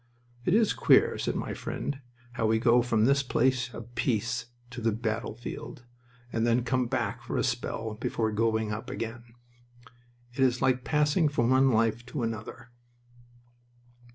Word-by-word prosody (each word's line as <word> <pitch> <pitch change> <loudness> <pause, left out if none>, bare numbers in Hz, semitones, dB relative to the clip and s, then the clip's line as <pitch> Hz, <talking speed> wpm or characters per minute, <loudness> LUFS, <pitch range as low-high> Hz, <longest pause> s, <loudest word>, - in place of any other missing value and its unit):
"It 180 - +3
is 220 -1 +3
queer," - - +4
said - - -1
my - - -3
friend, 140 -1 -4 0.3
"how 115 -2 0
we 110 0 +3
go 120 +1 +4
from 115 -3 +2
this 140 +2 +4
place 130 -1 +1
of 115 +1 -10
peace 115 0 -1 0.2
to 125 - -7
the 115 0 +2
battlefield, 115 +2 -5 0.5
and 115 - 0
then 120 +1 +2
come 125 +1 0
back 120 -5 -2
for - - -4
a - - +1
spell 110 -1 -2
before 110 0 -1
going 110 0 0
up 110 +1 -5
again. 115 +1 -6 1.0
It 135 - -12
is 130 -2 +3
like 130 -1 +2
passing 150 +2 +2
from 120 -4 +1
one 135 +1 +5
life 115 0 +1
to 125 0 -3
another." 115 +2 -5
120 Hz, 155 wpm, -28 LUFS, 115-130 Hz, 1.0 s, one